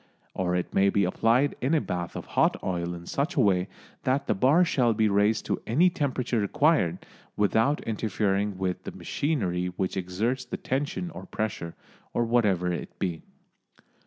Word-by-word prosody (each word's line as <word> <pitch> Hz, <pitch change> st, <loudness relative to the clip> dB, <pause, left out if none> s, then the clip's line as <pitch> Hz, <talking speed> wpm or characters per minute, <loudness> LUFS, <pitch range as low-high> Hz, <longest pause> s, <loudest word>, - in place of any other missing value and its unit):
Or 90 Hz, -1 st, -1 dB
it 90 Hz, -, -2 dB
may 100 Hz, +1 st, +4 dB
be 100 Hz, -1 st, +2 dB
placed 125 Hz, +8 st, +2 dB
in 140 Hz, +6 st, +2 dB
a -, -, +4 dB
bath 90 Hz, -9 st, -4 dB
of -, -, -5 dB
hot -, -, +3 dB
oil 85 Hz, -2 st, -2 dB
in 85 Hz, 0 st, -10 dB
such 145 Hz, -, -2 dB
a -, -, +1 dB
way 95 Hz, -5 st, +3 dB, 0.3 s
that 130 Hz, +2 st, 0 dB
the -, -, +1 dB
bar 135 Hz, -, +4 dB
shall 120 Hz, -8 st, +2 dB
be 110 Hz, 0 st, +3 dB
raised 105 Hz, +2 st, +2 dB
to -, -, -2 dB
any 165 Hz, +11 st, +4 dB
temperature 130 Hz, -8 st, -1 dB
required, 125 Hz, -, +2 dB, 0.3 s
without 110 Hz, +8 st, +2 dB
interfering 105 Hz, -2 st, -1 dB
with 95 Hz, -1 st, -2 dB
the -, -, -7 dB
machinery 90 Hz, -, -1 dB
which 90 Hz, +1 st, -3 dB
exerts 100 Hz, +8 st, -1 dB
the -, -, -5 dB
tension 145 Hz, +6 st, -2 dB
or -, -, -9 dB
pressure, 105 Hz, -6 st, -4 dB, 0.4 s
or 120 Hz, -, +2 dB
whatever 100 Hz, -7 st, +2 dB
it -, -, -6 dB
be. 85 Hz, -4 st, -2 dB
105 Hz, 170 wpm, -27 LUFS, 90-130 Hz, 0.4 s, may